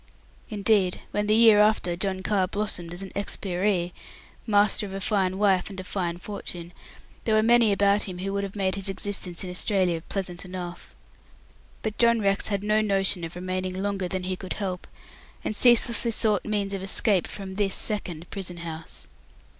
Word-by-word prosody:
Indeed, 200 Hz, -3 st, +1 dB
when 210 Hz, 0 st, -1 dB
the 215 Hz, -, +4 dB
year 220 Hz, -2 st, +7 dB
after, 210 Hz, -4 st, +3 dB
John 190 Hz, +1 st, -3 dB
Carr 195 Hz, -3 st, +1 dB
blossomed 195 Hz, -4 st, -3 dB
into 180 Hz, +3 st, -5 dB
an 190 Hz, -, -10 dB
"expiree", 185 Hz, -2 st, -1 dB, 0.5 s
master 205 Hz, 0 st, +3 dB
of 190 Hz, -, -9 dB
a 195 Hz, -, -4 dB
fine 190 Hz, -2 st, 0 dB
wife 195 Hz, -2 st, +2 dB
and 195 Hz, -1 st, -7 dB
a -, -, -5 dB
fine 175 Hz, -2 st, -3 dB
fortune, 180 Hz, -3 st, -7 dB, 0.5 s
there 220 Hz, -, +2 dB
were 215 Hz, -, +4 dB
many 235 Hz, -1 st, +5 dB
about 200 Hz, +1 st, +3 dB
him 185 Hz, -2 st, -6 dB
who 195 Hz, +2 st, -3 dB
would 200 Hz, 0 st, -1 dB
have 195 Hz, 0 st, -6 dB
made 190 Hz, -2 st, 0 dB
his 195 Hz, 0 st, 0 dB
existence 195 Hz, -2 st, -1 dB
in 180 Hz, -, -5 dB
Australia 180 Hz, -2 st, +1 dB
pleasant 180 Hz, -3 st, -3 dB
enough. 180 Hz, -1 st, -7 dB, 0.9 s
But 215 Hz, -1 st, -4 dB
John 235 Hz, -1 st, +4 dB
Rex 195 Hz, -1 st, +2 dB
had 200 Hz, -2 st, -2 dB
no 215 Hz, +1 st, +2 dB
notion 195 Hz, -3 st, +2 dB
of 165 Hz, +1 st, -6 dB
remaining 185 Hz, +1 st, -3 dB
longer 195 Hz, -2 st, -2 dB
than 185 Hz, +1 st, -3 dB
he 185 Hz, 0 st, -2 dB
could 185 Hz, 0 st, -6 dB
help, 185 Hz, -3 st, -4 dB, 0.6 s
and 215 Hz, -, -2 dB
ceaselessly 240 Hz, 0 st, +4 dB
sought 215 Hz, -3 st, +1 dB
means 205 Hz, -2 st, -1 dB
of 195 Hz, -, -3 dB
escape 195 Hz, 0 st, +1 dB
from 195 Hz, -2 st, -7 dB
this 195 Hz, -1 st, +1 dB
second 180 Hz, -6 st, 0 dB
prison 180 Hz, -3 st, -4 dB
house. 165 Hz, -1 st, -7 dB
195 Hz, 180 wpm, -26 LUFS, 185-210 Hz, 0.9 s, year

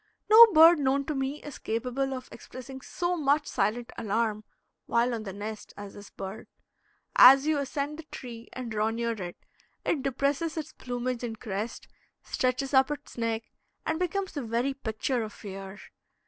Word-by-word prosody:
No 460 Hz, +2 st, +12 dB
bird 330 Hz, 0 st, +8 dB
known 275 Hz, 0 st, +1 dB
to 310 Hz, -, -2 dB
me 270 Hz, +1 st, -3 dB
is 295 Hz, -, -8 dB
capable 250 Hz, +4 st, -2 dB
of 255 Hz, 0 st, -8 dB
expressing 265 Hz, +1 st, -10 dB
so 350 Hz, +6 st, -2 dB
much 295 Hz, -1 st, +2 dB
silent 230 Hz, +1 st, -1 dB
alarm 215 Hz, 0 st, -1 dB, 0.4 s
while 235 Hz, +1 st, +2 dB
on 230 Hz, -, -3 dB
the 195 Hz, -, -4 dB
nest 210 Hz, +2 st, -7 dB
as 205 Hz, -1 st, -8 dB
this 205 Hz, 0 st, -11 dB
bird. 195 Hz, +3 st, -8 dB, 0.7 s
As 270 Hz, +3 st, +9 dB
you 310 Hz, -1 st, +2 dB
ascend 285 Hz, +2 st, -3 dB
the -, -, -7 dB
tree 235 Hz, -2 st, -8 dB
and 250 Hz, -2 st, -6 dB
draw 215 Hz, 0 st, +1 dB
near 235 Hz, +1 st, -1 dB
it, 180 Hz, -6 st, -6 dB, 0.5 s
it 295 Hz, -, +1 dB
depresses 280 Hz, +4 st, -1 dB
its 315 Hz, -1 st, -5 dB
plumage 245 Hz, 0 st, -4 dB
and 225 Hz, -2 st, -5 dB
crest, 210 Hz, +1 st, -5 dB, 0.4 s
stretches 260 Hz, +2 st, -1 dB
up 265 Hz, 0 st, +5 dB
its 295 Hz, 0 st, -6 dB
neck, 230 Hz, -1 st, -1 dB, 0.4 s
and 320 Hz, +1 st, -1 dB
becomes 375 Hz, +2 st, -1 dB
the 290 Hz, -, -4 dB
very 240 Hz, +3 st, -1 dB
picture 245 Hz, 0 st, -2 dB
of 215 Hz, -1 st, -5 dB
fear. 195 Hz, -1 st, -8 dB
255 Hz, 170 wpm, -28 LUFS, 225-285 Hz, 0.7 s, No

